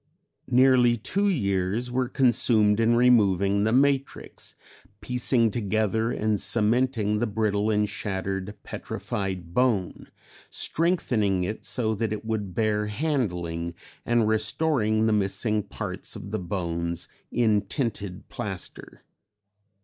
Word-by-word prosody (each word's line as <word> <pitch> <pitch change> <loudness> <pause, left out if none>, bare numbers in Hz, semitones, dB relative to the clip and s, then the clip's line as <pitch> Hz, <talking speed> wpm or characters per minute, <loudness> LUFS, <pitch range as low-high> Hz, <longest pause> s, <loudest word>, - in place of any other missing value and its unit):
Nearly 125 -1 +5
two 195 - 0
years 100 - 0
were 125 0 0
consumed 115 -5 +3
in 115 +1 +3
removing 100 -5 +4
the 110 - +2
matrix, 135 +2 0 0.4
piecing 125 -2 +1
together 110 +1 0
and 110 -3 0
cementing 115 -1 +1
the 120 - 0
brittle 105 0 0
and 105 -1 +2
shattered 95 0 -4
petrified 95 -4 -5
bone, 115 -7 0 0.4
strengthening 115 - 0
it 105 +5 -4
so 110 -4 0
that 110 0 -2
it 105 0 -4
would 105 -5 -3
bear 105 -2 +1
handling, 90 - -2 0.3
and 120 -2 +2
restoring 110 0 +1
the 110 - +3
missing 105 +2 +1
parts 100 - -6
of - - -8
the - - -1
bones 85 -2 -3 0.2
in 110 -3 +2
tinted 100 -3 -4
plaster. 95 -4 -7
110 Hz, 115 wpm, -26 LUFS, 100-120 Hz, 0.4 s, Nearly